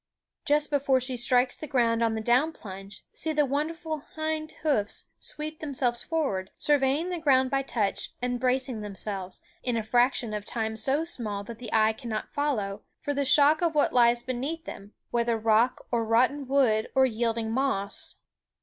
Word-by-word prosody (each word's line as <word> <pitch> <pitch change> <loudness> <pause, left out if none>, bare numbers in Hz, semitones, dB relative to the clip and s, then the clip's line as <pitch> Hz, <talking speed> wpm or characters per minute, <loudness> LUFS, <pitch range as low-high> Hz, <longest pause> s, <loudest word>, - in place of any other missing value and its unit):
Just 300 +1 +2
before 275 -2 +3
she 255 0 -2
strikes 245 +1 +3
the 310 - -7
ground 235 -3 +2
on 225 -1 +2
the 220 - -2
down 255 +8 +2
plunge, 195 -3 -10
see 315 - 0
the 300 -1 +3
wonderful 310 +3 -2 0.2
hind 315 0 -2
hoofs 245 -10 0
sweep 305 +1 -5
themselves 255 -5 -1
forward, 270 - -2
surveying 290 +4 +2
the 350 - -2
ground 265 -4 +3
by 275 0 +2
touch, 220 -7 -1
and 245 0 -2
bracing 255 -2 0
themselves, 195 -1 -4 0.2
in 245 -2 -1
a 225 - -1
fraction 240 0 +2
of 210 -1 -3
time 220 0 -3
so 270 +8 0
small 220 -11 -2
that 225 +2 -9
the 245 - -7
eye 220 0 +4
cannot 225 -2 -5
follow, 215 -9 -1 0.2
for 290 - -3
the 280 0 0
shock 295 +4 +5
of 335 -2 +1
what 295 - +2
lies 240 -1 +4
beneath 275 +7 -4
them, 200 +1 -9 0.2
whether 235 -1 +1
rock 225 +3 +2
or 235 -2 +1
rotten 255 +5 +2
wood 250 -6 +2
or 265 0 +6
yielding 230 -2 -1
moss. 265 +4 -1
250 Hz, 175 wpm, -27 LUFS, 225-290 Hz, 0.2 s, or